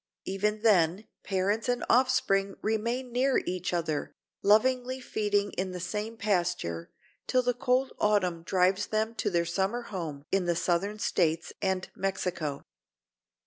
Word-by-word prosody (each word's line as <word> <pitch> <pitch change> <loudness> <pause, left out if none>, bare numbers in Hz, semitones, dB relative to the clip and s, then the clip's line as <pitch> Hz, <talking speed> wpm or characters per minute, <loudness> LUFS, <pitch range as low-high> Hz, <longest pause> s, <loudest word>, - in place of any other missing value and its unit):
Even 210 +3 -1
then 190 -2 +3 0.2
parents 200 +5 0
and 245 0 0
offspring 200 -6 +3
remain 235 +4 -1
near 260 +2 +2
each 180 0 -2
other, 160 -4 -2 0.3
lovingly 255 +5 +3
feeding 205 -4 0
in 185 0 -3
the 180 - -5
same 210 +5 -4
pasture, 175 - -1 0.4
till 255 0 +2
the 245 0 +2
cold 250 +2 +1
autumn 185 -5 +2
drives 185 +3 +2
them 220 +1 0
to - - -1
their 170 0 +1
summer 195 +8 -1
home 165 -9 -6
in 195 -2 +2
the 175 -1 +1
Southern 190 +5 0
States 165 -5 0
and 190 -1 -1
Mexico. 180 -6 -2
195 Hz, 140 wpm, -29 LUFS, 180-225 Hz, 0.4 s, then